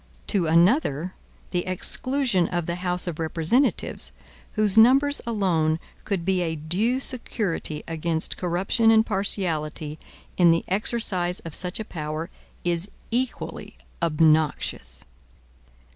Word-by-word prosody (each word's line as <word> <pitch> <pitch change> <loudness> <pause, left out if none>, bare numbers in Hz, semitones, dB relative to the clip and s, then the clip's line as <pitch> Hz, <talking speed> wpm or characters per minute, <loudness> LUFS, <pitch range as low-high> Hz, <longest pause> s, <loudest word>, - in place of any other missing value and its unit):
To 190 -6 +1
another, 170 - +3 0.4
the 175 -1 0
exclusion 235 +1 0
of 175 -2 -2
the 170 +1 -3
House 180 0 +1
of 170 -3 -4
Representatives, 165 - +1 0.4
whose 210 -2 +3
numbers 270 +6 +5
alone 170 -8 +1 0.3
could 190 -5 -2
be 190 -1 +1
a 165 -2 -1
due 190 - 0
security 210 - -2
against 165 0 0
corruption 185 +6 +1
and 220 0 +5
partiality 160 -7 -2 0.4
in 175 -2 +6
the 165 0 +2
exercise 190 -3 0
of 165 -5 -8
such 180 +4 +1
a 220 - -4
power, 155 -1 -5 0.3
is 175 +2 -1 0.2
equally 250 +2 -3 0.2
obnoxious. 155 - +1
180 Hz, 115 wpm, -25 LUFS, 160-215 Hz, 0.4 s, in